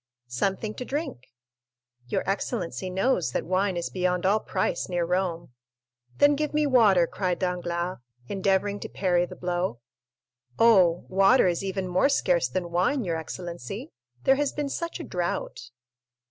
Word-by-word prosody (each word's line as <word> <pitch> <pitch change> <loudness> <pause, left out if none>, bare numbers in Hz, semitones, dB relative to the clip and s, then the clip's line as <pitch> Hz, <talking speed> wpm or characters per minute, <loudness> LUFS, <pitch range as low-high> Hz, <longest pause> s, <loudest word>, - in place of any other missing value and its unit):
"Something 195 - -2
to - - -4
drink." 275 - -4 0.8
"Your 125 - -2
excellency 185 - -2
knows 185 - 0
that - - -1
wine 185 +1 0
is 170 - -3
beyond 180 -1 0
all 205 +3 +4
price - - -2
near 175 -1 0
Rome." 175 -3 -1 0.7
"Then 290 0 +6
give 300 +1 -2
me 300 0 +3
water," 215 -10 +5
cried 180 +1 -2
Danglars, 180 -1 -2 0.3
endeavoring 195 +2 0
to - - -7
parry 180 -2 +1
the - - -10
blow. 175 -7 -2 0.8
"Oh, 185 -7 +5
water 195 +7 +5
is 175 0 0
even 190 -1 -2
more 180 +10 +3
scarce 180 - +2
than 175 +5 -3
wine, 210 +10 +1
your 170 -4 -1
excellency,—there 155 - -3
has 290 -1 0
been 295 -1 -3
such 335 +5 -4
a - - -5
drought." 175 - -3
185 Hz, 145 wpm, -26 LUFS, 175-210 Hz, 0.8 s, Then